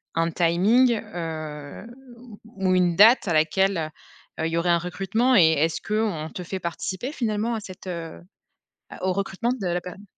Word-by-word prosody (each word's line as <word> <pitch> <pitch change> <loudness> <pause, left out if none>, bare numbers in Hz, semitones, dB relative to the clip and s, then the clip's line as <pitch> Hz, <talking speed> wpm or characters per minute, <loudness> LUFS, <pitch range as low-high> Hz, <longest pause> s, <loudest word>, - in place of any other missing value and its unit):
un 165 0 +1
timing, 205 +9 +3
heu, 155 0 -6 0.6
ou 195 -4 -1
une 175 -2 +2
date 220 +4 +6
à 170 - +1
laquelle, 160 +1 +1 0.5
heu, 160 - 0
il - - -4
y 165 - -1
aurait 170 +1 0
un 170 - +4
recrutement 195 +8 0
et 160 -5 +6
est-ce 160 +2 0
qu'on 210 -8 -2
te 180 - -7
fait 190 +2 -5
participer 185 - -4
finalement 230 -3 -1
à - - -3
cette, 185 -2 -11
heu 165 -2 -6 0.7
heu, - - -10
au 185 0 0
recrutement 200 +5 -2
de 185 - -1
la 175 +1 0
personne? 180 +3 -10
180 Hz, 175 wpm, -24 LUFS, 165-210 Hz, 0.7 s, date